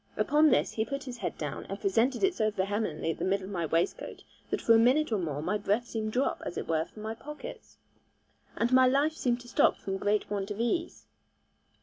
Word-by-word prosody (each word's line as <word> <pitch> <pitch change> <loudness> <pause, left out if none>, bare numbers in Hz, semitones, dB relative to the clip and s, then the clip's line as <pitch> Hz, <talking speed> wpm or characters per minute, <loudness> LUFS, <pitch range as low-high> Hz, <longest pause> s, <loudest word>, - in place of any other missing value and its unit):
Upon 300 +1 +4
this 255 - +2
he 220 - -1
put 275 +5 -4
his 245 -3 -8
head - - -3
down, - - -5
and - - -5
presented 265 - +1
it 385 -1 +4
so 215 -9 +1
vehemently 195 -5 -1
at - - -7
the - - -2
middle 190 0 0
of 195 - -8
my 170 -4 -2
waistcoat, 165 +3 -1 0.3
that - - -1
for 230 - +4
a 225 - +6
minute 260 +5 +3
or 215 - +1
more 150 -4 -3
my 200 +5 0
breath 205 +4 0
seemed 220 -2 -3
dropped, 255 +4 0
as - - -6
it - - -4
were, 160 0 +1
from 215 +3 -12
my 220 +1 -3
pockets, 300 +6 -10 0.8
and 240 +2 0
my 255 0 +7
life 280 +4 +2
seemed 245 -5 -1
to 245 - -13
stop - - +3
from 195 0 -4
great 205 +1 +1
want 200 -1 -2
of 205 +1 -5
ease. 335 +9 -1
225 Hz, 230 wpm, -29 LUFS, 195-255 Hz, 0.8 s, my